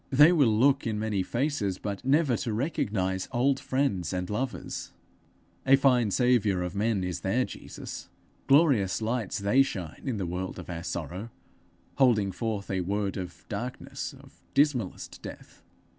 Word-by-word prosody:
They 145 Hz, +5 st, +7 dB
will 150 Hz, -7 st, +4 dB
look 130 Hz, +5 st, +3 dB
in 110 Hz, -1 st, -1 dB
many 105 Hz, -2 st, 0 dB
faces, 115 Hz, -2 st, -1 dB
but 100 Hz, +2 st, -5 dB
never 140 Hz, -1 st, +3 dB
to 115 Hz, -, -3 dB
recognize 100 Hz, -, -1 dB
old 135 Hz, +2 st, +2 dB
friends 125 Hz, -, 0 dB
and 90 Hz, +1 st, -3 dB
lovers! 125 Hz, +4 st, -4 dB, 0.7 s
A 135 Hz, +1 st, +6 dB
fine 125 Hz, -5 st, +3 dB
saviour 110 Hz, -5 st, +2 dB
of 90 Hz, -, -4 dB
men 105 Hz, -1 st, 0 dB
is 90 Hz, -1 st, -3 dB
their 120 Hz, +7 st, +1 dB
Jesus! -, -, -8 dB, 0.4 s
Glorious 135 Hz, -, +4 dB
lights 115 Hz, -1 st, -1 dB
they 100 Hz, +7 st, +4 dB
shine 90 Hz, -, -3 dB
in 130 Hz, -5 st, -1 dB
the 95 Hz, -, -2 dB
world 90 Hz, +2 st, -4 dB
of -, -, -7 dB
our 85 Hz, -1 st, -4 dB
sorrow, 90 Hz, +5 st, -5 dB, 0.7 s
holding 110 Hz, -7 st, +4 dB
forth 105 Hz, 0 st, -3 dB
a 95 Hz, -1 st, 0 dB
word 100 Hz, +1 st, -1 dB
of 90 Hz, -3 st, -7 dB
darkness, 125 Hz, +1 st, -5 dB
of -, -, -19 dB
dismallest 135 Hz, -9 st, 0 dB
death! -, -, -10 dB
110 Hz, 155 wpm, -28 LUFS, 95-130 Hz, 0.7 s, They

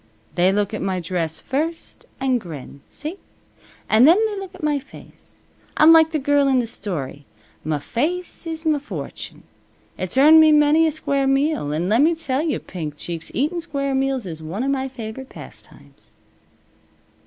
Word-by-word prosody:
They 180 Hz, +1 st, +3 dB
look 205 Hz, +1 st, 0 dB
at 215 Hz, -, -3 dB
my 190 Hz, -1 st, -1 dB
dress 165 Hz, -2 st, -3 dB
first, 320 Hz, +5 st, -4 dB
an' 260 Hz, -2 st, +1 dB
grin. 150 Hz, -, -10 dB
See? 310 Hz, +6 st, -5 dB, 0.7 s
An' 220 Hz, +4 st, +5 dB
then 330 Hz, +5 st, +7 dB
they 430 Hz, -1 st, -2 dB
look 385 Hz, -1 st, -8 dB
at 370 Hz, -, -13 dB
my 295 Hz, -1 st, +1 dB
face. 275 Hz, -, -15 dB, 0.3 s
I'm 310 Hz, +2 st, +8 dB
like 320 Hz, -1 st, +7 dB
the 315 Hz, -, 0 dB
girl 285 Hz, 0 st, +2 dB
in 265 Hz, -1 st, +3 dB
the 245 Hz, -, +1 dB
story. 155 Hz, -, -5 dB, 0.4 s
Muh 155 Hz, 0 st, -1 dB
face 330 Hz, -, -3 dB
is 325 Hz, 0 st, -4 dB
muh 305 Hz, -2 st, +2 dB
fortune. 290 Hz, -, -7 dB, 0.6 s
It's 185 Hz, +6 st, -3 dB
earned 305 Hz, +4 st, +8 dB
me 310 Hz, -1 st, +6 dB
many 300 Hz, +2 st, +5 dB
a -, -, +1 dB
square 280 Hz, -3 st, -1 dB
meal; 270 Hz, -, +1 dB
an' 160 Hz, +4 st, -1 dB
lemme 280 Hz, -, +3 dB
tell 280 Hz, -4 st, -1 dB
you, 315 Hz, -2 st, -1 dB
Pink 155 Hz, -5 st, -7 dB
Cheeks, 165 Hz, 0 st, -5 dB
eatin' 310 Hz, +7 st, 0 dB
square 275 Hz, -4 st, -2 dB
meals 265 Hz, -3 st, 0 dB
is 160 Hz, -3 st, -6 dB
one 175 Hz, +9 st, -4 dB
of 275 Hz, -, 0 dB
my 265 Hz, -1 st, -1 dB
favorite 255 Hz, 0 st, -8 dB
pastimes." -, -, -14 dB
270 Hz, 175 wpm, -21 LUFS, 190-310 Hz, 0.7 s, I'm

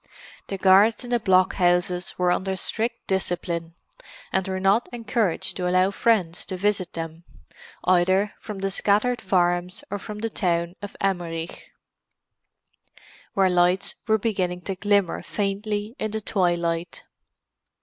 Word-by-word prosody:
The 195 Hz, -, -4 dB
guards 195 Hz, +6 st, +5 dB
in 245 Hz, -, -7 dB
the 240 Hz, -, +3 dB
blockhouses 180 Hz, -2 st, +2 dB
were 180 Hz, -1 st, +2 dB
under 190 Hz, +1 st, 0 dB
strict 230 Hz, +5 st, -2 dB
discipline, 170 Hz, -3 st, -2 dB, 0.6 s
and 190 Hz, 0 st, +1 dB
were 190 Hz, 0 st, -2 dB
not 195 Hz, +5 st, +2 dB
encouraged 230 Hz, -6 st, -1 dB
to 180 Hz, -1 st, -1 dB
allow 185 Hz, +2 st, +3 dB
friends 200 Hz, -6 st, +1 dB
to 185 Hz, -, -4 dB
visit 200 Hz, -1 st, 0 dB
them, 165 Hz, 0 st, -6 dB, 0.6 s
either 185 Hz, +3 st, +3 dB
from 210 Hz, -2 st, -7 dB
the 195 Hz, 0 st, -1 dB
scattered 210 Hz, +6 st, +1 dB
farms 180 Hz, 0 st, 0 dB
or 205 Hz, -, -2 dB
from 210 Hz, +2 st, -7 dB
the 225 Hz, +2 st, -2 dB
town 170 Hz, -3 st, 0 dB
of 205 Hz, -1 st, -8 dB
Emmerich, 175 Hz, -4 st, -3 dB, 1.7 s
where 195 Hz, -2 st, +4 dB
lights 180 Hz, +1 st, +3 dB
were 220 Hz, -1 st, +4 dB
beginning 185 Hz, -5 st, -1 dB
to 195 Hz, +1 st, -4 dB
glimmer 200 Hz, -2 st, +1 dB
faintly 205 Hz, +2 st, -3 dB
in 215 Hz, -, -1 dB
the 220 Hz, +1 st, -3 dB
twilight. 175 Hz, -3 st, -1 dB
190 Hz, 135 wpm, -24 LUFS, 175-205 Hz, 1.7 s, guards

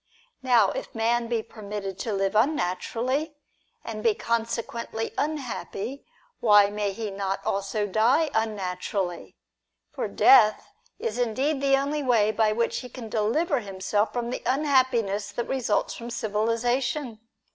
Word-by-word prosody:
Now, 240 Hz, -6 st, +4 dB
if -, -, -6 dB
man 230 Hz, +1 st, +1 dB
be 230 Hz, -1 st, -1 dB
permitted 200 Hz, -3 st, -6 dB
to 225 Hz, -, -3 dB
live 195 Hz, 0 st, 0 dB
unnaturally, 255 Hz, -, 0 dB, 0.5 s
and 215 Hz, -1 st, -5 dB
be 220 Hz, -2 st, +3 dB
consequently 230 Hz, 0 st, -3 dB
unhappy, 275 Hz, -4 st, -4 dB, 0.3 s
why 205 Hz, -2 st, +6 dB
may 205 Hz, -1 st, -1 dB
he 210 Hz, +1 st, -5 dB
not 195 Hz, 0 st, -2 dB
also 200 Hz, +2 st, -1 dB
die 230 Hz, -, +2 dB
unnatu 200 Hz, -5 st, -2 dB
rally? 185 Hz, -4 st, -3 dB, 0.6 s
For -, -, -3 dB
death 220 Hz, -, +5 dB, 0.3 s
is 460 Hz, -, -3 dB
indeed 265 Hz, +5 st, 0 dB
the 275 Hz, -1 st, +4 dB
only 285 Hz, +2 st, -1 dB
way 230 Hz, -6 st, +3 dB
by 215 Hz, 0 st, +2 dB
which 230 Hz, +2 st, 0 dB
he 250 Hz, -, -8 dB
can 240 Hz, -4 st, -8 dB
deliver 260 Hz, -, +1 dB
himself 205 Hz, 0 st, -1 dB
from 240 Hz, -1 st, -3 dB
the -, -, -4 dB
unhappiness 255 Hz, -7 st, +1 dB
that 240 Hz, -, -2 dB
results 255 Hz, -6 st, 0 dB
from 235 Hz, 0 st, -7 dB
civilisation. 235 Hz, +3 st, -1 dB
230 Hz, 135 wpm, -26 LUFS, 210-255 Hz, 0.6 s, why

